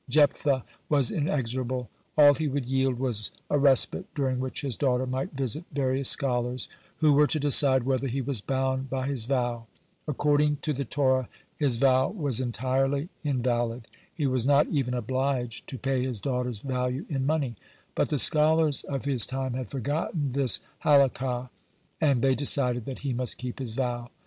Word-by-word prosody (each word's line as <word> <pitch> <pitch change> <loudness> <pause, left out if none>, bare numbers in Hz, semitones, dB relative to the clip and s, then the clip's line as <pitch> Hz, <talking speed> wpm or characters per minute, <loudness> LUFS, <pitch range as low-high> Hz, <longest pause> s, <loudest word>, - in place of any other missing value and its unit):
Jephthah 140 -2 +3 0.3
was 140 -6 +2
inexorable. 130 -4 -2 0.3
All 145 -1 +8
he 150 +3 -2
would 140 -2 -2
yield 130 0 0
was 120 -5 -1 0.2
a 145 - +3
respite 135 -2 +3
during 130 -3 0
which 130 0 -4
his 135 -5 -2
daughter 130 0 +1
might 130 +3 -3
visit 135 +3 -2
various 135 -1 +1
scholars, 125 -2 0 0.3
who 155 -2 +4
were 150 +1 +5
to 155 - 0
decide 140 -2 +4
whether 135 +1 0
he 130 +2 -2
was 130 -4 0
bound 130 +1 -1
by 130 0 -2
his 135 -5 -2
vow. 120 -3 -1 0.4
According 150 0 +2
to 155 - 0
the 140 0 -3
Torah 130 -1 +1 0.3
his 135 -6 +1
vow 130 +1 +3
was 145 - -1
entirely 135 +5 -1
invalid. 120 -4 -1 0.2
He 150 - -3
was 130 -3 +1
not 140 +2 +4
even 130 -5 -1
obliged 125 0 -2
to 130 - -6
pay 130 0 -1
his 125 -4 -3
daughter's 125 -3 -2
value 125 +2 -2
in 135 -4 -2
money. 145 -6 0 0.4
But - - 0
the 150 - 0
scholars 155 +1 +3
of 135 -1 -4
his 130 -6 +2
time 130 -1 -3
had 125 -4 -4
forgotten 145 - -2
this 130 -3 +1 0.2
Halakah, 130 -3 +2 0.5
and 140 -6 +2
they 135 -1 +4
decided 125 -3 +1
that 135 - -6
he 135 - 0
must 125 0 -3
keep 125 0 -6
his 125 -4 -5
vow. 120 -1 -2
130 Hz, 170 wpm, -27 LUFS, 125-140 Hz, 0.5 s, All